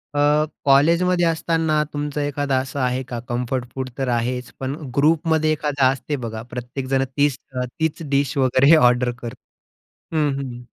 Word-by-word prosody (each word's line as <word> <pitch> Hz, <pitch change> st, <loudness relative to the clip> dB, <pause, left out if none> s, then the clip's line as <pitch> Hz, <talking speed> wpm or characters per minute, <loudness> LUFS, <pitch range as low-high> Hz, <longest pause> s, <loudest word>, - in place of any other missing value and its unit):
अ, 150 Hz, +1 st, +3 dB, 0.2 s
कॉलेजमध्ये 170 Hz, +6 st, +4 dB
असताना 160 Hz, -2 st, +1 dB
तुमचं 145 Hz, 0 st, -3 dB
एखादं 145 Hz, -1 st, -1 dB
असं 135 Hz, +1 st, -6 dB
आहे 125 Hz, 0 st, 0 dB
का? 120 Hz, -2 st, -6 dB
कम्फर्ट 125 Hz, +1 st, -1 dB
फूड 130 Hz, -1 st, -3 dB
तर 135 Hz, -1 st, -1 dB
आहेच, 125 Hz, +1 st, -2 dB
पण 135 Hz, +1 st, -3 dB, 0.2 s
ग्रुपमध्ये 155 Hz, +1 st, +2 dB
एखादा 145 Hz, -3 st, +1 dB
असते 140 Hz, +2 st, -3 dB
बघा, 110 Hz, -1 st, -5 dB
प्रत्येकजण 130 Hz, +2 st, -2 dB
तीच 145 Hz, -2 st, +2 dB, 0.2 s
अ 125 Hz, -, -1 dB
तीच 160 Hz, 0 st, -1 dB
डिश 140 Hz, -1 st, +1 dB
वगैरे 130 Hz, 0 st, +3 dB
हे -, -, +9 dB
ऑर्डर 125 Hz, -3 st, +4 dB
कर 120 Hz, 0 st, -5 dB, 0.8 s
हं, 150 Hz, -2 st, +2 dB
हं. 125 Hz, -3 st, -7 dB
140 Hz, 155 wpm, -21 LUFS, 125-150 Hz, 0.8 s, हे